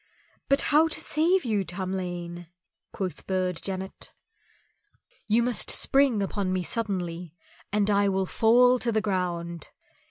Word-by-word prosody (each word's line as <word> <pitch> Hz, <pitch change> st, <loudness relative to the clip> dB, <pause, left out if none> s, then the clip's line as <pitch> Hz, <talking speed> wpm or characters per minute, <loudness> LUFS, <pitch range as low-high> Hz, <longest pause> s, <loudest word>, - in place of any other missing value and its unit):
"But 275 Hz, +1 st, +4 dB
how 310 Hz, +2 st, +6 dB
to 320 Hz, -, -3 dB
save 335 Hz, +2 st, +1 dB
you, 210 Hz, -4 st, 0 dB
Tamlane?" 175 Hz, -1 st, -5 dB, 0.4 s
quoth 185 Hz, -3 st, -5 dB
Burd 185 Hz, -2 st, -1 dB
Janet. 190 Hz, 0 st, -6 dB, 1.2 s
"You 225 Hz, +2 st, +3 dB
must 245 Hz, -1 st, 0 dB
spring 270 Hz, -7 st, +3 dB
upon 195 Hz, -1 st, -2 dB
me 185 Hz, -1 st, -1 dB
suddenly, 180 Hz, -6 st, -4 dB, 0.4 s
and 205 Hz, -1 st, +1 dB
I 200 Hz, -1 st, +3 dB
will 190 Hz, 0 st, 0 dB
fall 245 Hz, +5 st, +4 dB
to 240 Hz, -, -1 dB
the 220 Hz, -1 st, +1 dB
ground. 175 Hz, -5 st, -3 dB
195 Hz, 130 wpm, -26 LUFS, 180-230 Hz, 1.2 s, how